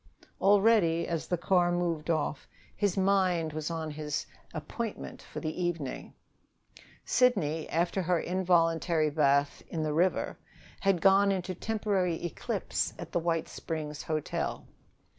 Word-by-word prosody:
Already, 195 -4 +4
as 165 -2 -2
the 175 - 0
car 175 0 +3
moved 170 -3 -1
off, 155 -3 -1 0.3
his 205 -2 0
mind 185 -5 +2
was 155 0 -3
on 160 -2 -3
his 150 -1 -3 0.3
appointment 210 +8 -5
for - - -8
the 160 +2 -3
evening. 165 -6 -3 0.9
Sidney, 165 -12 +2
after 175 +3 0
her 175 -1 +1
involuntary 165 -3 +2
bath 140 -1 +2
in 160 -2 -3
the 155 -1 -1
river, 180 +4 +1 0.4
had 195 -4 +2
gone 195 +1 +5
into 185 -1 -2
temporary 195 -3 0
eclipse 170 - -2
at - - -8
the - - +1
White 165 -1 0
Springs 150 -2 -5
Hotel. 155 -2 -3
170 Hz, 130 wpm, -30 LUFS, 155-190 Hz, 0.9 s, gone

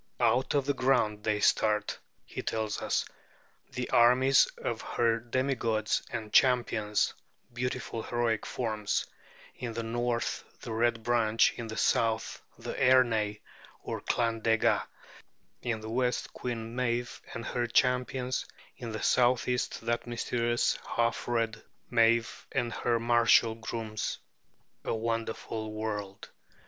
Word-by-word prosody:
"Out 130 +4 +2
of 140 -2 +2
the 140 - +1
ground 110 -6 +1
they 105 -1 +1
start," 105 0 +2 0.3
he - - -6
tells 110 -1 -2
us, - - 0 0.6
"the 125 0 -4
armies 125 +3 +6
of 115 -1 -3
her 115 -1 +1
demigods 115 -3 0
and 110 -1 -5
champions, 115 -5 +3 0.4
beautiful 120 -2 -3
heroic 120 -1 0
forms, 110 -4 -2 0.5
in 120 -2 -5
the 115 0 -3
North 120 +1 -1 0.2
the - - -6
Red 115 0 +1
Branch, 115 -2 +3
in 115 - -6
the 110 - -6
South 110 -1 +1 0.2
the - - -6
Ernai 115 -5 +3 0.4
or - - -4
Clan 115 -1 0
Dega, 115 0 +3 0.8
in 115 -3 -2
the 110 - -7
West 125 0 -1
Queen 115 -2 -5
Meave 120 -1 -1
and 115 - -5
her 120 -1 -1
champions, 125 +1 +1 0.3
in 120 -4 -6
the 110 - -4
Southeast 125 0 +2
that 120 +1 -2
mysterious 120 0 0 0.2
half 115 0 0
red 115 -2 -1 0.3
Meave 115 -1 +2
and 120 -1 -1
her 115 +1 0
martial 115 -1 +4
grooms!" 110 -1 -4 0.7
A - - -1
wonderful 110 -1 -3
world! 105 -2 -4
115 Hz, 125 wpm, -30 LUFS, 110-120 Hz, 0.8 s, armies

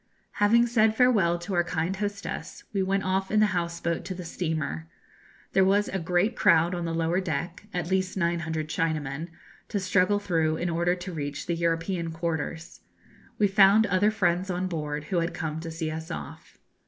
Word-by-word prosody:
Having 230 +3 +5
said 220 -2 +3
farewell 215 -9 +4
to 175 +3 -6
our 175 -1 +3
kind 175 +1 -2
hostess, 205 0 -5
we 200 - +1
went 195 +1 0
off 190 +1 0
in 215 - +3
the 215 - +6
house 170 -1 -2
boat 170 -1 -2
to 185 - -4
the 180 -1 -7
steamer. 155 - -3 0.7
There 190 - +5
was 200 +2 +3
a 190 - -2
great 180 +6 +1
crowd 165 +2 +4
on 175 -1 -2
the 165 - -2
lower 165 +3 +1
deck 170 +3 -4
at 175 -1 -3
least 185 0 0
900 165 -3 -1
Chinamen 155 -1 -2 0.4
to 205 - -2
struggle 185 +1 +2
through 165 -6 0
in 175 +1 -1
order 170 +2 +1
to 180 0 -7
reach 145 -2 -4
the 175 - -1
European 165 +1 -1
quarters. 160 - -4 0.6
We 210 - +4
found 200 +2 +6
other 200 +1 +3
friends 185 -3 0
on 180 0 -1
board, 150 -4 -3
who 175 +4 -2
had 170 +1 -2
come 160 -1 -3
to 165 0 -6
see 160 -1 -3
us 160 +1 -6
off. - - -8
175 Hz, 190 wpm, -27 LUFS, 165-195 Hz, 0.7 s, the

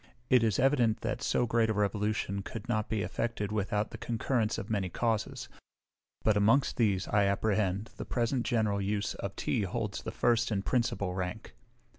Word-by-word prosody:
It 125 -2 +7
is 110 -4 +2
evident 125 -5 +3
that - - -2
so 120 - +1
great 115 -1 +2
a 110 - 0
revolution 105 -1 0
could 110 +4 -7
not 110 -3 -1
be 110 -3 0
effected 105 +2 -2
without 105 0 -1
the - - -8
concurrence 115 -1 0
of 105 - -5
many 100 -5 -1
causes; 110 +1 -1 0.8
but 110 - +4
amongst 110 +7 +3
these, 100 -5 +2
I 105 -1 +3
apprehend, 100 0 0
the - - -5
present 120 +1 0
general 110 -5 +1
use 100 0 -1
of - - -5
tea - - 0
holds 105 +1 -3
the - - -5
first 120 -1 +2
and 100 -3 -1
principal 115 -7 0
rank. 95 +4 -4
110 Hz, 175 wpm, -30 LUFS, 100-115 Hz, 0.8 s, It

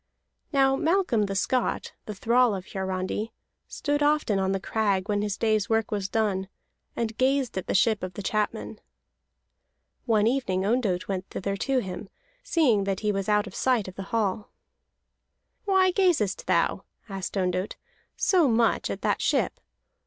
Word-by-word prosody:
Now 270 -2 +4
Malcolm 320 - +1
the 195 - -3
Scot, 250 +6 0
the 210 - -5
thrall 235 +2 +3
of 185 -1 -6
Hiarandi, 190 +3 -3 0.3
stood 290 0 -2
often 290 -9 +2
on 190 0 +1
the 195 - 0
crag 200 -2 0
when 205 -1 0
his 205 -1 -2
day's 215 -2 +1
work 225 -1 +1
was 200 -2 -2
done, 200 -4 0 0.5
and 225 -1 -2
gazed 265 -1 +1
at 190 - -4
the - - -1
ship 215 +2 +3
of 185 -1 -5
the 205 - -6
chapmen. 210 +1 -2 1.3
One 215 -2 +3
evening 225 -7 0
Ondott 210 -5 0
went 190 -1 -3
thither 195 +1 -3
to 265 +4 +1
him, 190 0 -7 0.3
seeing 290 - +2
that 195 -1 -2
he 210 -1 +1
was 195 0 -2
out 210 0 +3
of 200 - -10
sight 245 -5 +1
of 185 - -7
the 195 - -7
hall. 215 -2 -1 1.2
"Why 380 -2 +4
gazest 350 - +1
thou," - - +1 0.2
asked 195 -1 -5
Ondott, 185 +1 -1 0.4
"so 355 -6 +3
much 230 -1 +2
at - - -5
the - - +2
ship? - - 0
210 Hz, 160 wpm, -26 LUFS, 195-255 Hz, 1.3 s, Now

